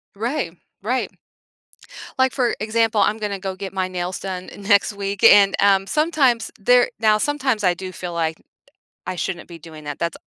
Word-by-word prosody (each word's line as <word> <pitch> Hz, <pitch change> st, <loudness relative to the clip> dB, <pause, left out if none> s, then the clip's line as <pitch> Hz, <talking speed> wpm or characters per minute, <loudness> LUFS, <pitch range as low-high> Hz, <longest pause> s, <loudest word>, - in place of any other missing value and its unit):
Right, 215 Hz, -, -3 dB, 0.3 s
right. 250 Hz, +5 st, -1 dB, 1.1 s
Like, 260 Hz, -1 st, +2 dB
for 250 Hz, -3 st, 0 dB
example, 220 Hz, 0 st, +1 dB
I'm 215 Hz, -, +2 dB
gonna 205 Hz, -2 st, -4 dB
go 190 Hz, 0 st, -4 dB
get 195 Hz, 0 st, -7 dB
my 185 Hz, -1 st, -1 dB
nails 180 Hz, 0 st, -4 dB
done 185 Hz, -1 st, -6 dB
next 205 Hz, 0 st, +2 dB
week 200 Hz, 0 st, -5 dB
and, 200 Hz, -1 st, +7 dB
um, 195 Hz, -1 st, +3 dB
sometimes 290 Hz, -7 st, +1 dB
there 245 Hz, +4 st, +4 dB
now 215 Hz, -1 st, +4 dB
sometimes 260 Hz, -3 st, -1 dB
I 180 Hz, -2 st, +3 dB
do 185 Hz, +1 st, -7 dB
feel 180 Hz, -1 st, -6 dB
like, 160 Hz, -1 st, -1 dB, 0.7 s
"I 185 Hz, -, -4 dB
shouldn't 175 Hz, +1 st, -4 dB
be 170 Hz, -1 st, -10 dB
doing 155 Hz, -1 st, -12 dB
that," 145 Hz, -1 st, -6 dB
that's 170 Hz, -1 st, -2 dB
200 Hz, 175 wpm, -21 LUFS, 185-225 Hz, 1.1 s, and